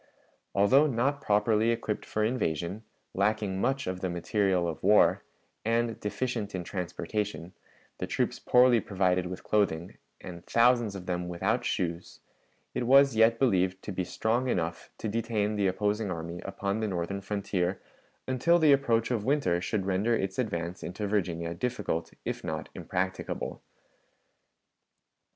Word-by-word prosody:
Although 130 +10 +5
not 140 +2 0
properly 105 +1 +2
equipped 115 -2 -2
for 110 - -1
invasion, 95 - -1 0.3
lacking 100 -1 0
much 135 +3 0
of 90 0 -3
the 95 - -2
material 90 +1 +1
of 80 - -5
war, 105 +3 +4 0.4
and 115 0 0
deficient 110 -1 -3
in 90 - -3
transportation, 90 +1 -4 0.5
the - - -3
troops - - -1
poorly 125 -1 +5
provided 90 -3 0
with 90 +1 -7
clothing, 90 -5 0 0.2
and 85 -2 -9
thousands 120 -3 +3
of 90 -2 -7
them 90 -1 -2
without 100 +8 0
shoes, 85 -4 -3 0.5
it 120 - -2
was 135 -1 +6
yet 115 +1 +5
believed 95 -7 +2
to - - -5
be 95 -1 -2
strong 115 +7 0
enough 85 -5 -2
to - - -4
detain 110 -1 -1
the 100 -2 +2
opposing 105 +2 0
army 85 0 -5
upon 100 +1 -2
the 110 - -1
northern 95 +1 -3
frontier 95 -2 -2 0.5
until 130 +7 +3
the 155 -4 +6
approach 120 -4 +2
of 115 -4 0
winter 115 -10 +1
should 100 0 -1
render 100 +5 +1
its 95 -1 -2
advance 90 -6 -2
into 95 +4 -4
Virginia 85 -5 -1
difficult, 85 -4 -2
if - - -3
not - - -4
impracticable. 95 +1 -3
100 Hz, 145 wpm, -29 LUFS, 90-115 Hz, 0.5 s, was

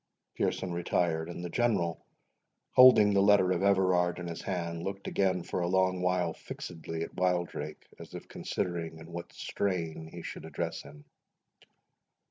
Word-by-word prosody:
Pearson 90 -2 -1
retired; 85 -1 0
and 85 0 -6
the - - -4
General, 100 -9 0 0.7
holding 110 -5 +8
the 100 - +4
letter 100 -2 +5
of 90 -1 +1
Everard 95 -3 +3
in 90 - -6
his 85 - -5
hand, 85 -2 -3
looked 95 +2 -5
again 95 -2 +1
for - - -3
a 85 - 0
long 95 0 +2
while 90 -2 +1
fixedly 80 -1 -6
at - - -7
Wildrake, 90 -1 -2
as - - -10
if - - -8
considering 85 -2 -3
in 80 +1 -12
what 85 0 -7
strain 85 -5 -3
he 85 -1 -8
should - - -7
address - - -4
him. 75 0 -14
90 Hz, 155 wpm, -30 LUFS, 85-95 Hz, 0.7 s, holding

